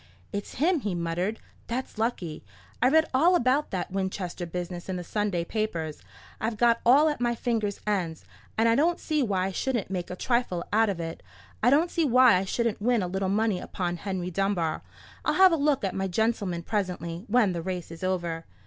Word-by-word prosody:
"It's 200 0 -5
him," 330 +5 +2
he 205 -8 -2
muttered; 175 +5 -2 0.3
"that's 240 -1 -4
lucky. 185 -9 -2 0.4
I 250 - +5
read 315 +3 +5
all 330 +8 +5
about 270 0 +2
that 185 -2 -3
Winchester 190 -2 -3
business 175 +1 -5
in 190 - -1
the 180 - -4
Sunday 200 -3 -1
papers. 170 -8 -3 0.4
I've 220 0 -2
got 235 +1 +4
it - - -26
all 285 +6 +7
at 295 -4 -1
my 240 -1 +1
fingers' 220 -4 -1
ends, 180 -6 -2 0.3
and 225 +1 +4
I 230 - +5
don't 325 +8 +2
see 305 -2 0
why 195 -7 +1
I 195 - -2
shouldn't 235 -1 -2
make 180 -2 -3
a 180 - -4
trifle 235 -5 0
out 220 0 +4
of 190 -4 -2
it. 165 -1 -5 0.4
I 240 - +5
don't 310 +6 +3
see 335 - +1
why 255 -3 +6
I 190 - -1
shouldn't 230 +1 -1
win 235 -2 +2
a - - -1
little 190 +1 -1
money 210 -1 +1
upon 175 -2 -3
Henry 185 -1 -4
Dunbar. 180 -4 0 0.4
I'll - - +1
have 380 0 +7
a - - +4
look 290 -4 +1
at 195 - -1
my 195 0 -1
gentleman 195 -3 0
presently, 180 -3 -3
when 215 -4 +3
the 170 - -3
race 180 -1 -4
is 165 +2 -9
over." 175 -3 -2
200 Hz, 205 wpm, -27 LUFS, 180-240 Hz, 0.4 s, all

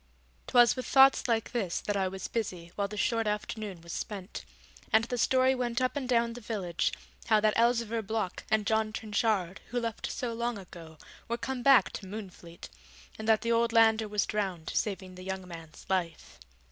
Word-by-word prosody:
'Twas 240 -2 +5
with 255 - -5
thoughts 270 -1 +6
like 225 -2 0
this 200 -8 -1
that 205 - -3
I 190 -1 +1
was 190 0 -5
busy 180 -7 -4
while 200 -1 -1
the 210 +1 -8
short 225 0 +1
afternoon 210 -3 -4
was 170 0 -8
spent, 200 -1 -6 0.5
and 220 +1 +5
the 245 +1 -3
story 260 +2 +4
went 245 -2 -1
up 255 +2 0
and 265 -3 -3
down 235 -1 +2
the 245 - -9
village, 195 -7 -1 0.4
how 220 -2 +5
that 215 0 +2
Elzevir 230 -1 +2
Block 215 -3 -3
and 220 -1 +2
John 220 0 +1
Trenchard, 210 -4 -1
who 245 - -2
left 230 -2 -4
so 240 -2 -3
long 235 0 -2
ago, 170 -4 -11 0.3
were 235 - -2
come 260 +1 -4
back 270 +1 +5
to 195 - -7
Moonfleet, 185 -4 -9 0.5
and 220 - -5
that 220 -1 +4
the 235 - -1
old 230 0 +2
lander 225 -1 +5
was 210 0 0
drowned 190 -6 -3
saving 190 -3 -2
the 185 0 -10
young 190 -1 -5
man's 165 -3 -11
life. 180 - -3
220 Hz, 190 wpm, -30 LUFS, 190-235 Hz, 0.5 s, thoughts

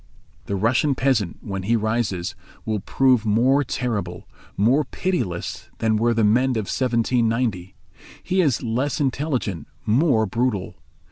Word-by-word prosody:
The 100 - -1
Russian 120 +8 +2
peasant, 125 -10 0
when 95 -1 -4
he 110 +5 +1
rises, 110 -5 -1 0.3
will 110 -1 -1
prove 125 +3 +2
more 125 +7 +3
terrible, 105 -9 -3 0.3
more 125 +9 +3
pitiless 145 - -3
than 110 -1 +1
were 115 +2 +2
the 115 - +2
men 120 +6 +3
of 110 -6 -2
1790. 115 -5 0 0.5
He 185 +1 +1
is 140 -9 +1
less 125 +4 -1
intelligent, 130 - -2 0.2
more 115 0 +3
brutal. 105 -5 -2
115 Hz, 130 wpm, -22 LUFS, 105-130 Hz, 0.5 s, more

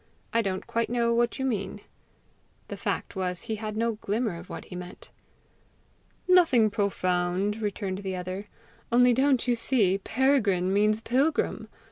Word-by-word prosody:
"I 230 - +3
don't 190 -3 -3
quite 230 0 -1
know 235 -1 +1
what 235 0 +1
you 265 - -2
mean." 205 -5 -2 0.9
The - - -4
fact - - -3
was 180 -2 -3
he 225 -2 -3
had 215 0 -5
no 230 +1 +1
glimmer 215 -1 -1
of 175 - -12
what - - -7
he 180 - -10
meant. 180 +1 -9 1.2
"Nothing 320 - +5
profound," 190 0 0
returned 200 -2 -3
the 190 -2 -4
other. 185 +3 -5 0.4
"Only 245 +1 +5
don't 265 0 +2
you 245 - +3
see 215 -6 +2
Peregrine 205 -6 +2
means 210 +2 +2
pilgrim? 275 +7 0
215 Hz, 150 wpm, -27 LUFS, 190-240 Hz, 1.2 s, Nothing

